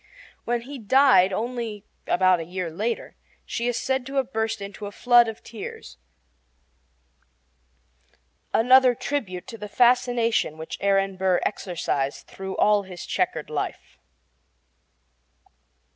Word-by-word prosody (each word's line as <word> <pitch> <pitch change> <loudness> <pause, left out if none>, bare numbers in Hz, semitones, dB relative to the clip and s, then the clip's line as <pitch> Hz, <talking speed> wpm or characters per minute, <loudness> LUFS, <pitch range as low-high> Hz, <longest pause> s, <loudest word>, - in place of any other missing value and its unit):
When 240 0 0
he 270 +3 -9
died, 245 -4 +5
only 225 -1 -4 0.2
about 185 -1 +3
a - - -3
year 175 0 -4
later, 220 +8 -3 0.3
she 235 - -3
is 245 - 0
said 265 -1 -1
to 275 - -7
have 270 -1 -1
burst 220 0 -1
into 200 +1 -7
a - - -7
flood 240 +2 +5
of 220 -1 -7
tears 135 - -9 2.5
another 255 +1 +5
tribute 220 -11 -4
to 230 -4 -10
the 210 - -7
fascination 240 -7 +2
which 160 0 -7
Aaron 195 -1 +1
Burr 185 -1 +2
exercised 155 -8 -2
through 190 0 -7
all 210 -1 +4
his 185 -3 -9
checkered - - -2
life. - - -5
215 Hz, 125 wpm, -24 LUFS, 190-245 Hz, 2.5 s, died